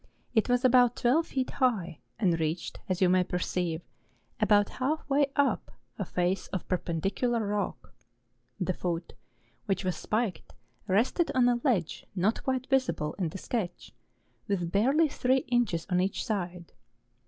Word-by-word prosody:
It 220 0 +2
was 245 +1 +2
about 245 -1 +5
twelve 295 +8 +2
feet 260 -1 -2
high, 200 - 0 0.2
and 180 -7 +2
reached, 160 +2 -2
as 185 0 +1
you - - +6
may 185 0 +4
perceive, 180 -2 -2 0.6
about 205 -2 +4
half 305 +5 0
way 280 0 +3
up 285 -1 +1 0.3
a - - -1
face 180 +2 -1
of 190 - -5
perpendicular 195 +7 0
rock. 205 -1 -3 0.7
The 185 0 0
foot, 170 -1 -3 0.5
which 195 -1 0
was 185 - 0
spiked, 215 -4 -2 0.3
rested 230 - +2
on 250 -1 +5
a 240 -1 +2
ledge 210 - 0
not 200 +5 +1
quite 260 -1 -1
visible 260 - 0
in 175 -4 0
the 175 - -7
sketch, 190 -3 -4 0.5
with 175 -4 -1
barely 270 - +4
three 260 -2 +1
inches 230 -10 +1
on 180 -3 +1
eacli 190 +2 0
side. 180 -5 -4
205 Hz, 150 wpm, -29 LUFS, 180-250 Hz, 0.7 s, you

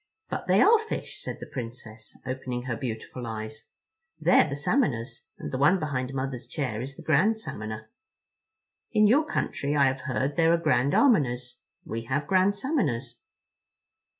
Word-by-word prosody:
"But - - -3
they - - +5
are 450 +1 +6
fish," 445 0 -5
said - - -5
the - - -7
Princess, 115 -3 -8
opening 130 -1 -4
her 125 -2 -2
beautiful 120 0 -5
eyes; 110 -1 -6 0.5
"they're 155 -1 +5
the 140 - -3
Salmoners, 140 - -1
and - - -6
the 130 - -2
one 150 +7 +5
behind 135 -6 -2
Mother's 130 -3 -4
chair 125 -6 -3
is 135 +2 -6
the - - -11
Grand 185 +9 +3
Salmoner. 110 - -6 1.1
In 215 -1 +5
your 275 +9 +5
country 145 - -1
I 140 -1 +5
have 135 0 0
heard 135 +1 -2
there 165 0 +5
are - - +4
Grand 140 -4 +2
Almoners. 125 - +2 0.3
We 115 - -4
have 140 +4 -1
Grand 185 +4 +3
Salmoners." 140 - -1
135 Hz, 160 wpm, -27 LUFS, 120-165 Hz, 1.1 s, are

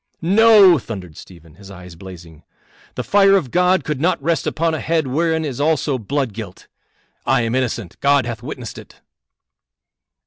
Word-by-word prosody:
"No!" 200 -2 +6
thundered 95 -9 -9
Stephen, 85 -2 -15
his 95 +3 -15
eyes 90 -2 -12
blazing. 85 -3 -13 0.5
"The - - -4
fire 195 -1 +4
of 150 -11 -1
God 180 +1 +2
could 150 -3 -4
not 180 +3 +1
rest 170 -1 -1
upon 165 0 -1
a 160 - -3
head 160 -2 -1
whereon 160 +4 -1
is 140 -2 -5
also 150 -3 0
blood 130 +1 -3
guilt. 105 -4 -10 0.6
I 125 -1 +1
am 115 0 -2
innocent; 120 -7 -3
God 140 -3 +2
hath 115 -2 -6
witnessed 125 -3 -8
it." - - -16
135 Hz, 165 wpm, -19 LUFS, 105-165 Hz, 0.6 s, No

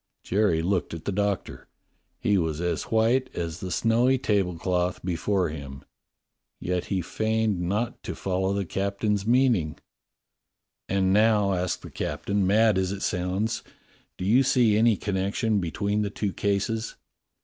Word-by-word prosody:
'" - - -55
Jerry 95 -5 +1
looked 90 -2 -1
at 80 - -10
the - - -1
Doctor. 100 0 -2 0.5
He 105 - +2
was 80 -4 0
as 90 0 -1
white 115 +4 +2
as 85 -1 -4
the 95 - -5
snowy 120 +7 +2
tablecloth 90 -5 0
before 90 +1 0
him. 70 -3 -8 0.8
Yet 90 0 -2
he 95 -3 -1
still - - -13
feigned 110 -3 +1
not 105 +7 -2
to - - -3
quite - - -13
follow 95 0 0
the 100 -1 -1
captain's 100 +3 -1
meaning. 120 - +2 1.1
"And 95 -1 +2
now," 105 -2 +4
asked 90 -1 -2
the - - -9
captain, 100 -1 -1
"mad 105 0 +4
as 95 0 0
it 100 -1 -4
sounds, 95 +5 -1 0.6
do 90 - -4
you 115 +7 +5
see 125 -5 +3
any 110 -1 +4
connection 100 +2 0
between 100 +4 -1
the 105 - -1
two 100 -1 -3
cases? 100 +3 -1
100 Hz, 155 wpm, -26 LUFS, 90-110 Hz, 1.1 s, you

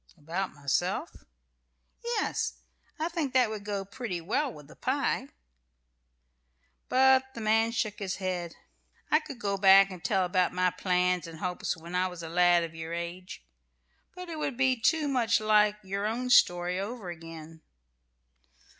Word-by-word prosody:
"About 170 +5 -3
myself?" 175 - -2 0.8
"Yes. 470 -2 -1 0.4
I 320 +1 -1
think 325 -6 -3
that 250 -4 +4
would 210 -2 -6
go 200 -1 -3
pretty 200 -3 -5
well 250 - -1
with 150 -8 -13
the - - -15
pie." - - -1 1.6
But 265 0 +4
the - - -6
man 225 +1 +2
shook 215 -3 -2
his 195 -3 -3
head. 180 -3 -4 0.6
"I 305 - +6
could 290 -5 -9
go 200 -4 -2
back 195 0 +7
and 180 -2 -9
tell 190 -3 +1
about 180 0 +1
my 180 0 +2
plans 180 -2 0
and 165 -1 -9
hopes 180 +1 -3
when 170 +2 -10
I 180 +1 +1
was 180 -2 -8
a 165 - -6
lad 175 0 +4
of 165 -1 -6
your 160 0 -6
age, 170 - -6 0.7
but 360 0 -8
it 325 -2 -6
would 275 -5 -3
be 260 -1 +3
too 295 +7 +1
much 245 -5 +2
like 210 -1 +4
your 200 +2 -2
own 250 +3 -2
story 175 -4 +4
over 200 -2 -5
again. 165 -1 -10
195 Hz, 160 wpm, -29 LUFS, 175-240 Hz, 1.6 s, back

